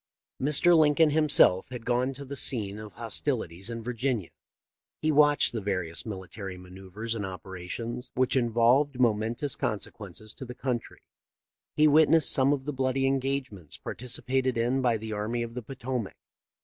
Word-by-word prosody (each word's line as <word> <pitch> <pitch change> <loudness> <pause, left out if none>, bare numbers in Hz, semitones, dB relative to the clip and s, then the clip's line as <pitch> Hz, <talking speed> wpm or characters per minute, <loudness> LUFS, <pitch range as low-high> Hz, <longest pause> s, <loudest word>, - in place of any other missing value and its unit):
Mr. 150 +5 +5
Lincoln 155 0 +5
himself 145 -11 +4
had 125 -3 -8
gone 125 +2 +1
to 140 +1 -9
the 140 +1 -6
scene 105 -7 0
of 105 -1 -9
hostilities 110 - -2
in 115 -1 -5
Virginia. 120 -5 -2 0.7
He 155 - +1
watched 145 0 +4
the 115 - -3
various 90 -2 -2
military 95 -1 -7
manoeuvres 95 +5 -7
and 110 -3 -4
operations, 95 +6 -6
which 130 +1 +1
involved 125 +3 +3
momentous 115 +4 +1
consequences 110 - -4
to - - -9
the 125 0 -8
country; 125 -3 -4 0.7
he 155 0 +5
wit 155 +1 +5
nessed 160 -1 +5
some 135 +1 +4
of 135 -2 -1
the 150 - -3
bloody 135 0 0
engagements 135 - -2
participated 125 +1 -2
in 120 +3 +1
by 120 -3 +2
the 110 0 -6
army 110 +3 -2
of 115 0 -7
the 125 - -5
Potomac. 125 -3 -5
120 Hz, 155 wpm, -28 LUFS, 105-135 Hz, 0.7 s, Mr